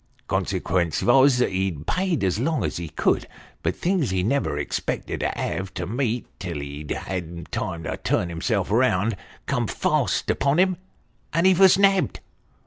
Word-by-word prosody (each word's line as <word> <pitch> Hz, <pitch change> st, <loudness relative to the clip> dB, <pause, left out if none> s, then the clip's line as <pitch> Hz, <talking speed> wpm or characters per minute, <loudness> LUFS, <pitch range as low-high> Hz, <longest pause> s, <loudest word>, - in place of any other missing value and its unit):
Consequence 85 Hz, -4 st, 0 dB
vos, 130 Hz, +2 st, +5 dB
that 125 Hz, -, +2 dB
he 95 Hz, +1 st, 0 dB
paid 165 Hz, -, -1 dB
as 95 Hz, +2 st, +1 dB
long 155 Hz, +5 st, 0 dB
as -, -, -2 dB
he 85 Hz, -2 st, -5 dB
could; -, -, 0 dB, 0.3 s
but -, -, -1 dB
things 175 Hz, -7 st, 0 dB
he 95 Hz, -1 st, 0 dB
never 115 Hz, -, 0 dB
expected 75 Hz, -, -3 dB
to -, -, 0 dB
have 95 Hz, 0 st, -3 dB
to 90 Hz, -, -3 dB
meet 120 Hz, +3 st, -1 dB
till 85 Hz, -6 st, -4 dB
he'd 70 Hz, +1 st, -7 dB
had 85 Hz, -3 st, -5 dB
time 85 Hz, -1 st, -3 dB
to -, -, -3 dB
turn 90 Hz, -, 0 dB
himself 95 Hz, +4 st, -1 dB
round, 115 Hz, -2 st, +2 dB, 0.3 s
come -, -, 0 dB
fast -, -, 0 dB
upon 140 Hz, +2 st, +1 dB
him, 185 Hz, 0 st, +3 dB, 0.6 s
and 165 Hz, +3 st, +2 dB
he 190 Hz, -, +7 dB
vos 190 Hz, +1 st, +6 dB
nabbed. 195 Hz, -6 st, +3 dB
105 Hz, 165 wpm, -24 LUFS, 85-145 Hz, 0.6 s, he